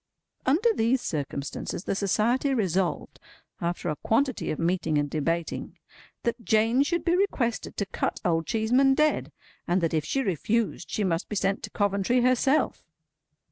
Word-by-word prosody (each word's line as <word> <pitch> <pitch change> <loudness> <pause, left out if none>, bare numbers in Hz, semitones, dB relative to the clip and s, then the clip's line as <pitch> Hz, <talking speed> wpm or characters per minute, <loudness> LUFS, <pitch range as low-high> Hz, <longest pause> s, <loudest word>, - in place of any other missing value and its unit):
Under 390 - +3
these 245 - +2
circumstances, 145 - -4
the - - -1
Society 230 +8 +1
resolved, 190 -5 -1 0.4
after 175 +1 -2
a 155 - 0
quantity 260 +2 0
of 155 - -2
meeting 165 -2 0
and 145 0 +1
debating, 165 +3 -2 0.5
that 235 0 -2
Jane 225 +3 +3
should 345 +4 0
be 345 0 +3
requested 270 - -1
to 200 - 0
cut 195 - -2
Old 165 -2 +1
Cheeseman 250 +5 +3
dead; 305 +1 +1 0.4
and 175 +2 +2
that 165 -1 0
if 155 -2 +1
she 270 - -1
refused, 210 - -1
she 210 - -1
must 170 -2 -1
be 210 - -3
sent 195 0 0
to - - -6
Coventry 205 +4 +1
herself. 255 +4 +2
215 Hz, 155 wpm, -27 LUFS, 170-255 Hz, 0.5 s, Under